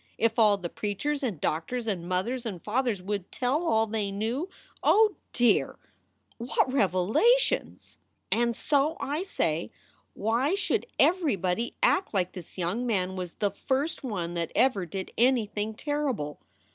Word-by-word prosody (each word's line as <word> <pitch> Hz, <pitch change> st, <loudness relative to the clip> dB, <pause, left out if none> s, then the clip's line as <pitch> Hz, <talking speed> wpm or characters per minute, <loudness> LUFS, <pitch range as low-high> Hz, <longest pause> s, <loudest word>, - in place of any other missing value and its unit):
If 230 Hz, +1 st, +1 dB
all 210 Hz, -2 st, +5 dB
the 180 Hz, -3 st, -4 dB
preachers 220 Hz, -, -2 dB
and 220 Hz, -, -2 dB
doctors 170 Hz, -, -2 dB
and 180 Hz, -5 st, -3 dB
mothers 230 Hz, +8 st, -1 dB
and 205 Hz, -7 st, -5 dB
fathers 215 Hz, -1 st, -1 dB
would 200 Hz, -1 st, -3 dB
tell 265 Hz, +6 st, 0 dB
all 225 Hz, -9 st, +3 dB
they 215 Hz, -2 st, -2 dB
knew 230 Hz, -, -2 dB, 0.3 s
oh 430 Hz, -1 st, +5 dB, 0.2 s
dear, 240 Hz, -1 st, +2 dB, 0.6 s
what 250 Hz, +2 st, 0 dB
revelations! 270 Hz, -, +2 dB, 0.3 s
"And 235 Hz, 0 st, +2 dB
so 295 Hz, +5 st, +1 dB
I 295 Hz, +4 st, -2 dB
say, 165 Hz, -, -1 dB, 0.5 s
why 240 Hz, -, +1 dB
should 400 Hz, +3 st, -1 dB
everybody 230 Hz, -, +1 dB
act 380 Hz, -, +2 dB
like 185 Hz, -1 st, +1 dB
this 180 Hz, -1 st, -10 dB
young 190 Hz, +8 st, -1 dB
man 190 Hz, -4 st, 0 dB
was 180 Hz, -2 st, -5 dB
the 205 Hz, -1 st, -1 dB
first 275 Hz, +10 st, -2 dB
one 180 Hz, -9 st, -3 dB
that 170 Hz, -1 st, -2 dB
ever 205 Hz, -9 st, +2 dB
did 190 Hz, +3 st, -5 dB
anything 220 Hz, -4 st, +1 dB
terrible 270 Hz, -, -2 dB
225 Hz, 145 wpm, -28 LUFS, 190-270 Hz, 0.6 s, all